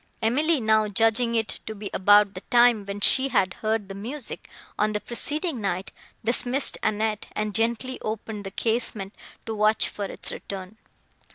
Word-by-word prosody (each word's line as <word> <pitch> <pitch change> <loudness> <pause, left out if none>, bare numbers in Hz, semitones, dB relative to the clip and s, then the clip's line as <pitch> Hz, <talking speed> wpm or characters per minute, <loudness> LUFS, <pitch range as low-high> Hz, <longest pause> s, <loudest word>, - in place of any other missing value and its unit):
Emily 295 +8 +2
now 220 -1 +2
judging 225 +3 +2
it 225 -1 +3
to 220 - -5
be 200 -1 -7
about 205 +1 +5
the 185 - -8
time, 240 -4 +4
when 200 +1 -5
she 265 +6 +4
had 185 -8 +1
heard 220 -2 -1
the 195 - -7
music, 235 +7 -7 0.3
on 215 0 +1
the 210 - -1
preceding 295 - -2
night, 190 -1 -3 0.3
dismissed 245 +3 +3
Annette, 215 0 -1
and 215 -1 -2
gently 235 +4 -1
opened 215 -1 -5
the 195 - -5
casement 220 -2 -1 0.3
to 225 - -4
watch 215 0 +2
for 205 - -5
its - - -4
return. 195 +1 -8
220 Hz, 165 wpm, -25 LUFS, 205-235 Hz, 0.3 s, about